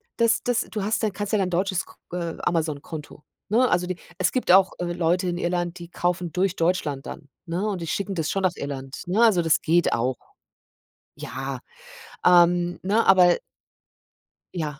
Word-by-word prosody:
das 230 -1 +2
das 245 -2 +1
du 210 - -3
hast 220 +2 -1
dann 215 - +1
kannst 205 +1 -5
ja 210 - +3
dein 185 -1 0
deutsches 185 +1 0
K - - -18 0.2
äh, 170 -2 -3
Amazon 155 -4 0
Konto, 150 -1 -9 0.3
ne? 245 +4 +4
Also, 180 0 +1
die 180 -1 -4 0.2
es 185 - +1
gibt 255 - -2
auch, 190 0 +6
äh, 175 -1 -2
Leute 175 +2 +1
in 175 0 -1
Irland, 175 0 -2
die 170 -1 -10
kaufen 175 -1 -2
durch 185 +2 0
Deutschland 160 -5 -1
dann, 145 - -9 0.2
ne, 180 +5 -2
und 190 -4 -3
die 165 - -5
schicken 195 +4 -2
das 160 -2 -1
schon 195 -1 -1
nach 180 -2 +1
Irland, 135 -1 -6
ne? 200 +6 +1
Also, 200 -7 +5
das 165 -2 +3
geht 170 +2 +2
auch. 125 +2 0 1.0
Ja, 135 -1 -5 0.6
ähm, 175 0 +4
ne, 210 +5 +1
aber 185 -2 +6 1.2
Ja. 150 -4 -4
175 Hz, 185 wpm, -24 LUFS, 165-195 Hz, 1.2 s, auch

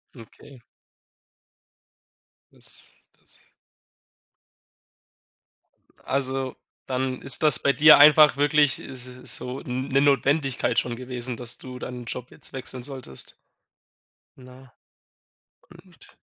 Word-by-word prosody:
Okay. 125 +3 -15 1.9
Das, - - -13 0.3
das - - -20 2.6
Also, 135 -1 -3 0.3
dann 130 0 -3
ist 135 +3 -1
das 145 -6 +5
bei 140 - +2
dir 155 +1 +8
einfach 150 0 +7
wirklich 145 -2 +2
s 130 -2 -9 0.3
so 125 +2 -6
'n 130 +2 -5
'ne 135 +1 +3
Notwendigkeit 140 -3 +1
schon 120 -1 -4
gewesen, 125 -1 -6
dass 120 -1 -6
du 125 -1 -10
deinen 125 -1 -7
Job 125 +2 -6
jetzt - - -12
wechseln 130 -1 -7
solltest. 130 - -7 1.0
Na? 130 0 -16 1.0
Und 175 0 -18
130 Hz, 100 wpm, -24 LUFS, 125-140 Hz, 2.6 s, dir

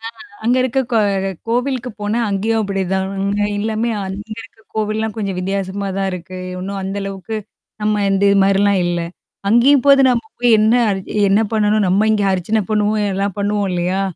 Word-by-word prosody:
அ 225 - -16 0.4
அங்க 245 +2 +3
இருக்க 260 +1 0
கோ 225 - +4 0.5
கோவிலுக்கு 250 +1 -1
போனா 210 +3 -1
அங்கேயும் 220 +3 0
அப்படிதான். 190 -1 -1 0.5
எல்லாமே 220 +2 -1 0.2
அங்க 205 +3 -6
இருக்க 225 - -15
கோவில்லாம் 215 0 -1
கொஞ்சம் 195 -4 -3
வித்தியாசமா 195 +1 -3
தான் 195 0 0
இருக்கு. 180 +1 -7 0.2
இன்னும் 195 +1 -4
அந்த 195 +1 -4
அளவுக்கு, 195 +2 -5 0.5
நம்ம 210 -1 +1
இந்த 195 0 +1
இது 200 - +4
மாரிலாம் 195 0 +3
இல்ல. 175 0 -1 0.5
அங்கேயும் 255 +5 +5
போது 275 -1 +7
நம்ம 240 +2 0 0.2
போய் 240 -3 +5
என்ன 220 +2 +4 0.2
அரி 190 -1 -2 0.3
என்ன 200 +3 +4
பண்ணணும்? 210 -1 +2
நம்ம 200 +4 +3
இங்கே 205 -2 +1
அரிச்சனை 200 +4 0
பண்ணுவோம் 210 0 +1
எல்லாம் 195 +1 -2
பண்ணுவோம் 205 -1 0
இல்லையா? 180 +2 0
205 Hz, 165 wpm, -18 LUFS, 195-220 Hz, 0.5 s, போது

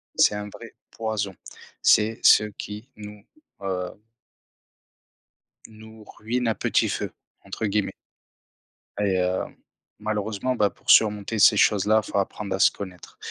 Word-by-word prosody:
c'est 105 - +4
un 105 0 -5
vrai 115 +2 -12 0.2
poison. 105 -4 -3 0.5
C'est 110 +2 +3
ce 105 - +7
qui 105 +5 -8
nous, 105 -1 -11 0.4
heu 95 +1 -4 1.7
nous 110 0 -14
ruine 120 +2 -2
«à 110 - +1
petit - - +1
feu» - - -3 0.3
entre 110 - -5
guillemets 105 0 0 1.1
et 100 -2 +1
hem, 90 0 -1 0.4
malheureusement, 110 +3 -2
bah, 105 -3 +2
pour - - -15
surmonter 105 0 +4
ces 105 - +6
choses-là, 105 +2 +3
il - - -9
faut - - -1
apprendre 100 0 -2
à - - -6
se - - +6
connaître, 90 -4 -10
105 Hz, 135 wpm, -24 LUFS, 100-110 Hz, 1.7 s, ce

